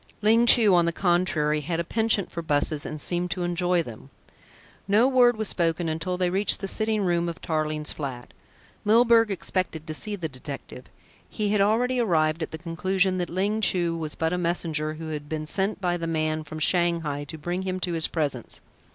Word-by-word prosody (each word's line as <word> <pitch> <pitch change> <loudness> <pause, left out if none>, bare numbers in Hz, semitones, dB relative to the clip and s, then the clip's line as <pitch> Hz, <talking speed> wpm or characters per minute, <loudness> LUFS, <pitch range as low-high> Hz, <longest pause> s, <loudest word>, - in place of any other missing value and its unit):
Ling 230 +3 +4
Chu 220 -5 +7
on 170 -1 +4
the - - +2
contrary 170 -4 +1
had 165 +2 -3
a - - 0
penchant 220 +1 0
for 170 - -4
buses 150 -1 0
and 155 - -6
seemed 175 +4 0
to 180 0 -2
enjoy 175 0 +1
them. 120 0 -11 0.8
No 210 +5 +4
word 245 -3 +4
was 220 -1 -2
spoken 170 -1 0
until 165 +3 -2
they 180 -1 0
reached 195 +3 +2
the 195 - -4
sitting 215 +1 0
room 175 -2 +1
of 170 +1 -7
Tarling's 155 -1 -2
flat. 130 -5 -6 0.5
Milburgh 230 +1 +5
expected 185 -4 -3
to 155 - -5
see 210 +6 -3
the 175 -5 -4
detective. 130 -2 -9 0.4
He 210 -2 -2
had 205 -1 +2
already 245 +5 +2
arrived 160 -7 +1
at 160 - -3
the 160 - -7
conclusion 185 +3 0
that 175 - -2
Ling 200 +5 -1
Chu 175 -5 +2
was 155 -2 -5
but 160 +1 -1
a 180 - -1
messenger 160 -3 -1
who 160 0 -7
had 150 -1 -6
been 155 -1 -3
sent 195 +7 -1
by 175 -2 0
the 165 -1 -4
man 155 -1 -1
from 155 +1 -8
Shanghai 165 -3 0
to 160 - -8
bring 175 +4 -3
him 185 -1 -3
to 175 -1 -1
his 165 -1 +1
presence. 145 -7 -3
175 Hz, 200 wpm, -25 LUFS, 155-195 Hz, 0.8 s, Chu